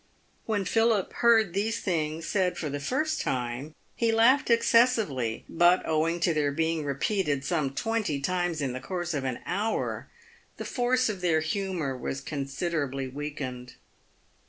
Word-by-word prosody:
When 205 -3 0
Philip 225 0 +2
heard 225 -6 +4
these 220 +4 0
things 160 -3 -2
said 185 -2 0
for 150 -4 -3
the 145 - -3
first 305 - -1
time, 125 +4 -3 0.2
he 230 -1 +1
laughed 250 +6 +4
excessively, 230 - +2
but 175 +2 +4
owing 160 +2 +1
to 170 -1 +3
their 150 -2 +1
being 160 +1 0
repeated 145 0 -1
some 140 -4 -1
twenty 220 -7 -1
times 175 +1 -1
in 130 -3 -1
the 130 - -4
course 175 +5 -4
of 140 -3 -2
an 130 -2 -2
hour, 210 +4 -2 0.5
the - - -5
force 255 +1 +1
of 205 -4 -3
their 165 -3 +2
humour 165 -4 -2
was 130 +2 -4
considerably 140 -1 -3
weakened. 130 -3 -6
165 Hz, 150 wpm, -28 LUFS, 140-210 Hz, 0.5 s, heard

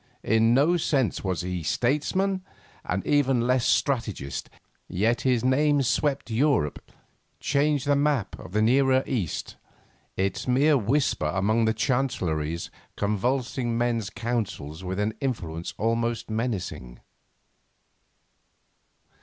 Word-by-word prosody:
In 115 +2 +3
no 155 +7 +4
sense 140 -7 0
was 95 -2 -1
he 90 -1 -3
Statesman, 150 - 0 0.4
and 95 +2 -2
even 135 -4 +2
less 125 0 +2
strategist, 115 - -1 0.4
yet 110 +6 +1
his 125 -2 +1
name 145 +2 +3
swept 135 +1 0
Europe, 120 - 0 0.5
changed 145 0 +1
the 145 0 +3
map 140 -8 +1
of 95 - -10
the 105 +1 +2
Nearer 130 +2 +4
East, 110 - -3 0.6
its 95 +4 -1
mere 140 +5 +4
whisper 130 - +1
among 110 +5 +2
the 110 - +2
Chancelleries 90 - -1 0.3
convulsing 120 +3 -1
men's 115 -3 0
counsels 110 -9 -4
with 95 +1 -3
an 105 +1 0
influence 85 - -3
almost 115 +1 -1
menacing. 105 - -3
120 Hz, 110 wpm, -26 LUFS, 100-135 Hz, 0.6 s, no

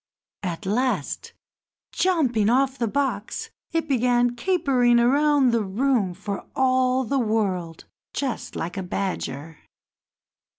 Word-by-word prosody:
At 180 +1 -4
last, 250 +7 -1 0.6
jumping 260 - +2
off 265 +2 +2
the 235 - +1
box, 280 +4 -2 0.2
it 330 -1 -1
began 245 -2 +2
capering 250 -6 +2
about 280 +1 +4
the 230 -2 +1
room 205 -2 0
for 200 +1 -5
all 255 0 +2
the 270 +3 0
world 195 -8 -1 0.3
just 265 -4 -4
like 175 +4 -4
a - - -1
badger. 165 -5 -4
245 Hz, 115 wpm, -24 LUFS, 200-270 Hz, 0.6 s, about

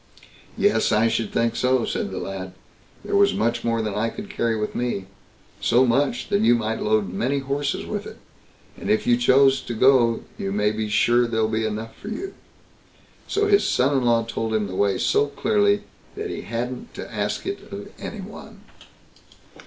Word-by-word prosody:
"Yes, - - +2
I 110 +2 +4
should 115 -2 -1
think 115 0 +1
so", 125 -1 +2
said - - -2
the - - -6
lad; 95 -1 -5 0.5
"there - - -1
was 200 0 +4
much 120 +1 0
more 115 -1 0
than 105 -2 -2
I 110 +3 0
could 205 - -8
carry 115 - 0
with 105 - -3
me—so 120 +2 -1
much, 140 - +1
that 200 0 +2
you 120 - +5
might 115 -1 -2
load 105 -4 +1
many 130 +8 0
horses 140 +1 -2
with - - -4
it; - - -10 0.6
and - - -6
if 110 - +2
you 120 - +4
choose 135 +2 +4
to 120 - -5
go, 120 -1 +4 0.2
you 95 - -2
may 105 +1 +1
be 110 0 -3
sure 120 +3 +3
there'll 110 -1 +1
be 110 0 0
enough 110 +1 -5
for - - -12
you." 380 - -5 0.9
So 415 +1 +1
his 405 -1 +4
son 135 +3 +2
in 130 - +2
law 115 -1 +3
told 115 -1 -3
him 105 -1 +1
the 95 - -6
way 100 0 +2
so 145 - +2
clearly, 205 +6 +1 0.3
that - - -4
he - - -5
hadn't 125 - -5
to - - -8
ask - - -2
it 390 +1 -5
of - - -7
any - - -6
one. - - -11
120 Hz, 190 wpm, -23 LUFS, 110-140 Hz, 0.9 s, you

